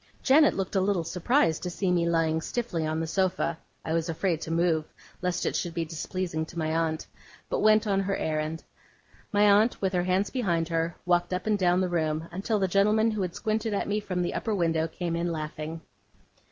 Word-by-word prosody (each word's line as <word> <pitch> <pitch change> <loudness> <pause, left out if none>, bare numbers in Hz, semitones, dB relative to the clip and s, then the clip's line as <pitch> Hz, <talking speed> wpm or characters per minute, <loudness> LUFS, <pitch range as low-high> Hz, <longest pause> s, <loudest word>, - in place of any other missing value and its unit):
Janet 290 +2 +5
looked 195 +1 -3
a 190 - +3
little 190 -3 +1
surprised 170 - +1
to 180 - -3
see 180 +1 -1
me 170 -1 +2
lying 160 -1 +1
stiffly 175 -7 -2
on 155 +1 -1
the 165 - -1
sofa 175 -1 0 0.3
(I 160 - -1
was 165 +1 0
afraid 165 0 -1
to 160 - -5
move 165 -1 +2 0.4
lest 180 0 -1
it - - -1
should 175 -2 -2
be 165 -1 -1
displeasing 165 +1 -3
to 170 - -11
my 160 -1 -1
aunt), 160 -1 -1 0.5
but - - +1
went 215 0 +4
on 200 -2 +1
her 195 0 0
errand. 155 +1 -2 0.7
My 205 0 +3
aunt, 210 +3 +4
with 190 -1 -1
her 175 -1 +1
hands 185 +2 +1
behind 175 -10 0
her, 165 0 -1
walked 175 0 +2
up 185 - -4
and 215 -1 +2
down 180 0 +3
the 185 - +1
room, 160 -2 -1
until 200 +5 -1
the 195 -2 +1
gentleman 210 +4 +3
who 215 -2 -2
had 180 -2 -3
squinted 220 -1 -1
at - - -1
me 210 +1 0
from 185 -4 -2
the 175 - -2
upper 220 -2 -1
window 165 -3 +1
came 170 0 -3
in 170 +1 -1
laughing. 155 0 -5
175 Hz, 215 wpm, -27 LUFS, 165-200 Hz, 0.7 s, Janet